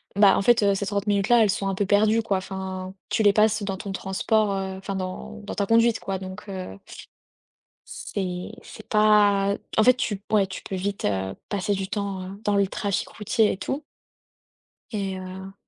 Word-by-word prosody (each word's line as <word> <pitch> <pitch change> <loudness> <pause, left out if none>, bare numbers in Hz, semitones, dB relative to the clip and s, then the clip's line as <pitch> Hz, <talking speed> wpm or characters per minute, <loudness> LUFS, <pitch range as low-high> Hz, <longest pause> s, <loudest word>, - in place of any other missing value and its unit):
bah 200 -1 +6
en - - +1
fait, 230 +1 +4
heu, 200 -1 +4
ces 200 +1 -2
30 205 +1 -2
minutes 200 -1 +2
là, 240 -1 +6
elles 210 - +2
sont 195 +1 -1
un 195 - -1
peu 200 +1 0
perdues 215 +3 +3
quoi. 200 -3 0
Enfin, 190 0 -5 0.2
tu 220 - +1
les 205 -1 +6
passes 215 0 +3
dans 195 -1 -2
ton 200 +1 -6
transport, 200 +2 0
heu, 190 -1 -3
enfin, 195 +1 -5
dans 65 - -5
dans - - -6
ta 200 - 0
conduite 230 +1 +4
quoi, 195 -1 -3
donc, 185 +1 -9
heu 185 - -6 1.4
c'est 180 -2 -3
c'est 220 - -12
pas, 205 -2 +4 0.2
en 220 - +6
fait, 250 +2 +6
tu 205 -5 -2
ouais, 205 -3 +4
tu 190 - -7
peux 195 - -5
vite, 195 +2 -3
heu, 95 -1 -1 0.2
passer 205 0 0
du 195 -1 -2
temps, 200 -2 -3
heu, 195 +1 -9
dans 205 -1 +1
le 200 -1 +3
trafic 200 0 -2
routier 215 +1 +1
et - - -4
tout 275 +9 -3 1.1
et 195 -3 -2
heu 190 +1 -8
200 Hz, 205 wpm, -25 LUFS, 190-210 Hz, 1.4 s, bah